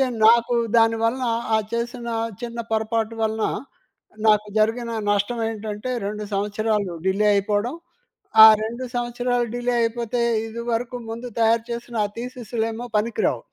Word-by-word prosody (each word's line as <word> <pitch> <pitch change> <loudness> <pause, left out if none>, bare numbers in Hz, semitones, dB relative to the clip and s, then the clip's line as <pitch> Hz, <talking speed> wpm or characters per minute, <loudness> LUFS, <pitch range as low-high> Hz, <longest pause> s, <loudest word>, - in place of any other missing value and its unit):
అయితే 270 - +4 0.2
నాకు 235 +1 +5 0.2
దాని 225 0 +4
వలన 250 +2 0 0.3
ఆ - - +3
చేసిన 235 +1 -3 0.3
చిన్న 235 0 -5
పొరపాటు 220 0 0
వలన 220 0 0 0.8
నాకు 210 0 +4
జరిగిన 230 +2 +1 0.2
నష్టం 205 +4 0
ఏంటంటే 215 +2 -5 0.2
2 210 +1 -4
సంవత్సరాలు 205 -1 -1
డిలే 200 +2 +2
అయిపోవడం. 205 +5 0 0.7
ఆ - - +13 0.2
2 235 +4 -4
సంవత్సరాలు 245 0 -1
డిలే 245 0 -1
అయిపోతే 235 +1 -1 0.2
ఇది 230 +1 -6
వరకు 240 +2 -2
ముందు 235 +2 -6
తయారు 225 0 +3
చేసిన 235 0 -5
ఆ - - -1
థీసిస్‌లేమో 235 -1 -4
పనికి 225 +2 -1
రావు. - - -3
230 Hz, 140 wpm, -23 LUFS, 215-240 Hz, 0.8 s, ఆ